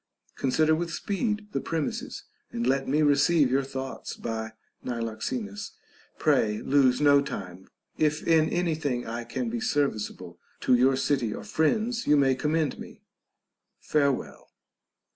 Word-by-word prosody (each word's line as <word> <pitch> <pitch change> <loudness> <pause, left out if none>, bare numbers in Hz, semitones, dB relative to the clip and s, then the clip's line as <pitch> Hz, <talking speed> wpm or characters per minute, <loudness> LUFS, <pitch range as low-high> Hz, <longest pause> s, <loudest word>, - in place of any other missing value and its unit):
Consider 155 +4 +2
with 170 +2 -1
speed 210 +4 -2
the - - -2
premises, 160 -3 -3 0.3
and 120 0 -2
let 135 +1 +1
me 150 +3 +2
receive 145 -1 +4
your 135 +1 +3
thoughts 135 -1 -6
by 110 -1 -5 0.3
Niloxenus. 110 -3 -4 0.4
Pray 105 -1 +2
lose 130 -2 +3
no 145 -1 +5
time. 95 -8 -7 0.3
If 155 0 +1
in 160 -2 +4
any 175 -2 0
thing 140 -6 -2
I 115 +1 -4
can 120 - -4
be 240 - -2
serviceable 140 - -2 0.2
to - - +3
your 130 +2 +4
city 130 -5 0
or - - -7
friends, 220 +9 0
you 150 - +5
may 135 -2 +4
command 150 +2 -1
me. - - -11 0.8
Farewell. 140 -3 -1
140 Hz, 140 wpm, -27 LUFS, 120-155 Hz, 0.8 s, no